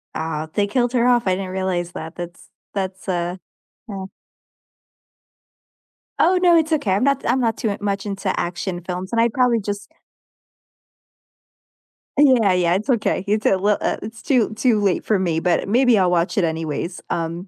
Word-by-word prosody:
Uh, 160 -1 -3
they 205 -1 +1
killed 245 +2 0
her 245 0 +3
off, 240 -4 +3
I 185 - +3
didn't 190 -1 -5
realize 185 -2 -2
that. 160 0 -8
That's 175 0 -9 0.2
that's 190 -1 -4
a 175 0 -2 0.5
yeah. 195 -2 -5 2.1
Oh, 365 +1 +4
no, 345 -2 +6
it's 320 0 +1
okay. 255 -11 0
I'm 200 +6 +2
not 275 -1 +1
I'm 260 - +2
not 230 -2 0
too 210 -3 -1
much 200 0 -2
into 195 -1 -3
action 175 +1 -3
films, 180 +2 -5
and 230 0 +2
I'd 235 -1 +2
probably 250 -3 +3
just 205 0 -5 2.3
Yeah, 255 -9 +5
yeah, 175 -1 +2
it's 215 +7 -3
okay. 225 -5 +1
It's 210 +1 0
a 195 - +4
li 205 +2 +2
uh, - - -1
it's 220 +1 -8
too 240 -6 +1
too 220 -1 +2
late 195 -3 +1
for 215 - +2
me, 165 -3 0
but 175 +2 0
maybe 245 0 +4
I'll 180 -2 +3
watch 175 +2 0
it 190 - +3
anyways, 160 +1 -3
um, 170 +3 -3
195 Hz, 175 wpm, -21 LUFS, 180-230 Hz, 2.3 s, no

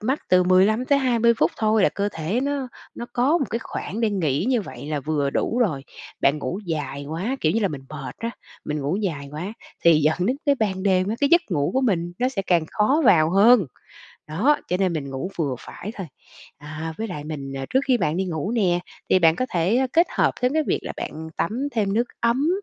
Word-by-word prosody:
mắt 260 +7 0
từ 180 0 +5
15 185 +2 +5 0.2
tới 280 -1 +4
20 235 -3 +3
phút - - +3
thôi 215 -2 +2
là - - +5
cơ 200 0 -2
thể 165 +10 -2
nó 280 -2 -2 0.3
nó 235 - -6
có 275 +8 +2
một - - 0
cái 230 - -1
khoảng 225 -1 -5
để 225 - +2
nghỉ 160 -9 0
như 250 -3 +2
vậy 150 - -9
là 150 -2 -2
vừa 145 -1 -1
đủ 230 - -1
rồi. 160 - +1 0.4
Bạn 140 +2 +3
ngủ 175 +5 -3
dài 140 -3 -3
quá, 190 - -2
kiểu 155 - +2
như 225 - +1
là, 200 - +2
mình 140 -3 -7
mệt 145 -3 -7
á, 230 - -3 0.3
mình 150 0 -3
ngủ 145 +6 -1
dài 165 -9 -3
quá 180 +8 -5 0.3
thì 165 -2 +6
dẫn 155 +2 +2
đến 255 +3 +1
cái 285 - +5
ban 195 -7 -1
đêm 190 -1 +2
á 220 - 0
cái 285 - +3
giấc 345 - +7
ngủ 145 -4 +1
của 265 - +3
mình 175 -9 0
nó 250 - +2
sẽ 220 -7 -3
càng 175 -4 +2
khó 265 +10 +2
vào 160 -8 +5
hơn, 200 - +6 0.6
đó, 215 - +2
cho 180 - +1
nên 185 -1 +1
mình 145 -4 -4
ngủ 135 +7 -4
vừa 145 -6 -1
phải 210 - -8
thôi. 190 -4 -6 0.5
À, 155 +2 -6
với 225 - -3
lại 150 -6 -6
mình, 140 -3 -6
à, 135 0 -4
trước 265 - +3
khi 260 -2 +4
bạn 155 -7 0
đi 190 - 0
ngủ 170 +1 -3
nè 190 -7 +2 0.3
thì - - +6
bạn 165 -2 +4
có 255 - -1
thể 195 +10 +2
kết 335 +2 +5
hợp - - +3
với 250 -1 +2
cái 315 - +3
việc - - +1
là - - -5
bạn 160 +1 -6
tắm 245 +10 -1
thêm 205 -4 0
nước 235 +2 +2 0.2
ấm, 245 +6 +2
190 Hz, 240 wpm, -23 LUFS, 155-235 Hz, 0.6 s, giấc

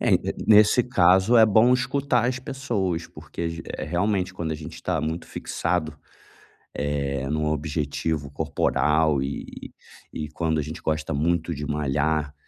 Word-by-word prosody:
É, - - +2
e - - +7
e - - -2
nesse 110 +3 +6
caso, 95 -1 +4
é 110 -1 +8
bom 110 +4 +5
escutar 125 -1 +1
as 125 0 -1
pessoas. 105 -10 -2
Porque, 85 0 -6
eh, - - -4
realmente 90 +4 -1
quando 85 -3 -4
a - - -2
gente 75 -1 -8
está 80 - -2
muito 80 +2 -3
fixado, 85 -3 -2 0.9
eh, 70 -2 -2
num 75 +1 -1
objetivo 75 -1 -2
corporal, 75 0 +1
e 70 +1 -7 0.4
e 75 -1 -5
quando 80 0 -1
a - - +1
gente 80 +2 -7
gosta 80 -1 -2
muito 85 +3 0
de 75 +1 -5
malhar, 75 0 -1
80 Hz, 155 wpm, -24 LUFS, 75-100 Hz, 0.9 s, é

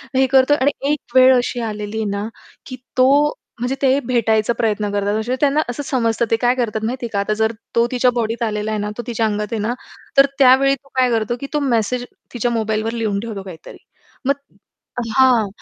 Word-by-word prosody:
हे 265 0 +4
करतोय 265 +2 +4
आणि 280 +2 +3 0.2
एकवेळ 260 -3 +4
अशी 245 0 -1
आलेली 210 -1 -4
आहे 220 - -1
ना, 200 +1 -3 0.4
की 255 - -7 0.2
तो 255 0 +5 0.5
म्हणजे 250 +3 -1
ते 270 0 +3
भेटायचा 225 -2 +1
प्रयत्न 210 -2 0
करतात. 205 +1 0
असे 240 +4 -2
त्यांना 290 +1 +3
असं 245 +4 -4
समजतं 235 -4 0
ते - - +5
काय 245 +2 +2
करतात 220 -3 -2
माहितीये 240 +1 -3
का, 200 - 0
आता 200 +1 0
जर 220 +1 +1 0.2
तो 235 0 +4
तिच्या 250 0 +2
बॉडीत 230 0 -1
आलेला 215 -1 -2
आहे 215 - -1
ना, 205 0 -3
तो 240 - -4
तिच्या 230 -2 0
अंगात 210 -1 -1
आहे 225 - -1
ना, 225 +3 -1 0.4
तर 275 - +8
त्यावेळी 270 +1 +5
तो 275 +1 -24
काय 255 -1 +3
करतो, 225 0 0
की 275 - -4
तो 300 - +1
मेसेज 245 -2 0 0.3
तिच्या 240 0 -1
मोबाईलवर 220 0 -1
लिहून 220 -4 -1
ठेवतो 210 -2 -6
काहीतरी. 175 -4 -11 0.5
मग 275 - +3 0.8
हां. 250 -5 +5
235 Hz, 200 wpm, -19 LUFS, 215-255 Hz, 0.8 s, तर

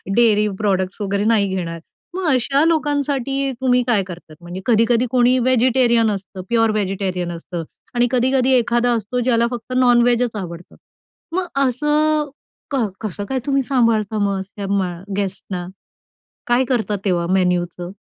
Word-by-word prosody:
Dairy 215 -3 +4
products 195 -1 -1
वगैरे 200 0 -1
नाही 215 -3 +3
घेणार." 170 -2 -4 0.4
मग 375 0 -2
अशा 275 +3 +2
लोकांसाठी 285 -4 0
तुम्ही 250 -1 +3
काय 220 -5 +2
करता? 175 -4 -11
म्हणजे 175 +2 -7
कधी-कधी 230 +1 +3
कोणी 250 0 +4
व्हेजिटेरियन 245 -2 +3
असतं, 195 -1 -6
प्युअर 225 -1 +3
व्हेजिटेरियन 190 -4 -2
असतं 170 0 -6 0.3
आणि 240 0 +3
कधी-कधी 260 +1 +2
एखादा 240 0 +2
असतो 230 +2 -2
ज्याला 235 -1 +2
फक्त 245 +1 -6
नॉनव्हेजच 245 -1 +3
आवडतं. 175 -3 -7 0.6
मग 370 -1 -1 0.2
असं 300 +3 +1 0.4
कर 265 -5 +1 0.2
कसं 205 -2 -4
काय 265 - 0
तुम्ही 275 -1 +2
सांभाळता 230 -5 +1
मस 200 -1 -1
या 200 - -3
मग 190 0 -2
गेस्टना? 190 -2 -4 0.8
काय 240 +2 +3
करता 235 -4 -1
तेव्हा 175 -3 +1
मेनूचं? 180 -1 0
230 Hz, 140 wpm, -20 LUFS, 195-255 Hz, 0.8 s, Dairy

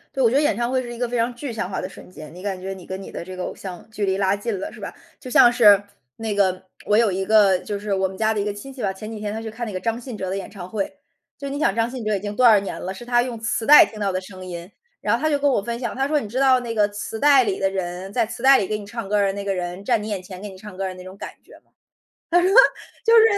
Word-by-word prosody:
对， 265 - +1
我 230 - +5
觉 255 - -1
得 - - +4
演 305 +2 +2
唱 240 +1 -1
会 260 0 +1
是 240 -1 -7
一 - - -9
个 245 0 -2
非 245 - -1
常 235 +1 0
具 265 +1 -5
象 220 -5 -3
化 190 - -3
的 185 - -5
瞬 - - -13
间， 155 -4 -11
你 180 - -11
感 195 -1 -3
觉 190 +1 -5
你 185 -2 -11
跟 190 0 -6
你 - - -10
的 - - -6
这 185 0 -8
个 185 - -4
偶 - - -4
像 180 -3 -9
距 210 -1 -2
离 190 -1 +1
拉 195 0 +2
近 205 +1 -3
了， 190 - -5
是 - - -13
吧？ - - -6 0.3
就 255 - -9
像 240 -1 +7
是 210 -5 +6 0.3
那 220 -1 -3
个 190 -2 +1 0.2
我 210 - +3
有 225 -3 +4
一 190 +1 -2
个 200 -3 +5
就 205 - -4
是 205 0 -3
我 190 0 +1
们 190 0 -10
家 220 +1 +2
的 215 - -2
一 205 - -1
个 205 - -2
亲 240 +7 -9
戚 260 - -9
吧。 195 -3 0
前 215 +3 -8
几 220 - -6
天 210 0 -4
他 220 - -4
去 225 -1 -6
看 235 +1 -5
那 210 - -6
个 185 - -3
张 230 +3 -2
信 245 -2 -8
哲 190 -2 -4
的 190 - -2
演 195 - -6
唱 185 -3 -9
会， 210 +7 -3 0.4
就 280 - -8
是 - - -6
你 285 - -3
想 200 -10 +2
张 230 +1 0
信 255 -1 -6
哲 215 -1 +1
已 195 - -3
经 205 0 -4
多 250 +4 +2
少 220 -3 +7
年 195 - -5
了， 185 - -4
是 215 +5 -10
他 240 0 +3
用 245 -2 -5
磁 225 0 -2
带 295 +4 +10
听 215 - -11
到 200 -1 0
的 185 - -1
声 185 0 -11
音。 175 +1 -8 0.3
然 210 - +1
后 240 - -4
他 310 - +2
就 290 - +2
跟 285 0 +2
我 245 - +1
分 235 +3 -4
享， 240 - -2
他 270 +1 -1
说 300 +1 +1
你 215 - -7
知 250 +5 -2
道 260 -2 +4
那 235 -2 -4
个 210 -2 +3
磁 205 +2 -6
带 280 -1 +6
里 200 -4 -2
的 195 - +2
人， 185 0 -4
在 235 -1 +2
磁 225 - -8
带 270 +1 +7
里 195 - -1
给 215 +1 -2
你 205 - -9
唱 225 0 -6
歌 210 - +2
儿 200 -1 +3
的 195 - -1
那 200 0 -5
个 200 -1 -1
人， 180 +1 -4
站 230 0 +1
你 210 - -6
眼 200 -4 -4
前 185 0 -10
给 210 - -6
你 190 -2 -11
唱 205 0 -11
歌 195 - -2
的 185 - -5
那 185 0 -11
种 185 +1 -10
感 - - -6
觉 - - -17
吗？ - - -40 0.6
他 350 +1 +4
说， 365 - +3 0.6
就 460 0 +6
是 450 - +8
210 Hz, 370 characters per minute, -22 LUFS, 190-240 Hz, 0.6 s, 带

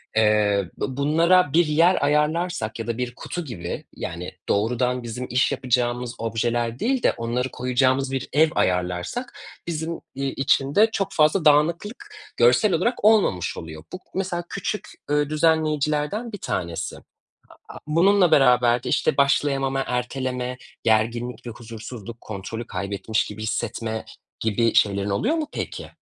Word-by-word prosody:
Eee, 105 -3 +3
bu 130 -1 -3
bunlara 160 +2 +3
bir 170 0 +5
yer 165 +2 +3
ayarlarsak 150 -5 0
ya 115 - -4
da 115 - -2
bir 125 0 -3
kutu 175 +4 -5
gibi, 90 - -6
yani, 85 +1 -5 0.2
doğrudan 125 +4 +1
bizim 120 +2 -5
iş 125 +2 +2
yapacağımız 120 -1 -1
objeler 115 +1 -1
değil 255 +1 0
de - - +5
onları 120 +3 -2
koyacağımız 130 +2 +1
bir 135 -1 -3
ev 155 +2 +5
ayarlarsak, 90 - -1 0.3
bizim, 165 0 -3 0.2
iii, 135 0 -2
için 135 0 +1
de 220 +2 +6
çok 195 -2 -2
fazla 155 +3 +3
dağınıklık 170 - +2 0.3
görsel 125 - +4
olarak 205 +6 0
olmamış 195 - +3
oluyor. 80 -1 -8
Bu 185 - -5 0.2
mesela 180 -2 -2
küçük, 200 +1 -4 0.2
ııı, 145 0 +1
düzenleyicilerden 155 - +1
bir 205 - -6
tanesi. 85 - -3 0.7
A - - -9
a - - -7
bununla 180 +3 +4
beraber 125 -2 +4
de, - - -3
işte, - - +1
başlayamama, 135 -1 +2
erteleme, 125 0 -2 0.3
gerginlik 115 +2 0
ve - - -3
huzursuzluk, 115 0 -9
kontrolü 110 +3 -6
kaybetmiş 100 +3 -2
gibi 105 +1 -7
hissetme, 110 0 -3 0.3
gibi 115 +1 +1
şeylerin 100 -1 +2
oluyor 235 - +1
mu 315 -2 -2
peki? - - -5
125 Hz, 145 wpm, -23 LUFS, 115-160 Hz, 0.7 s, de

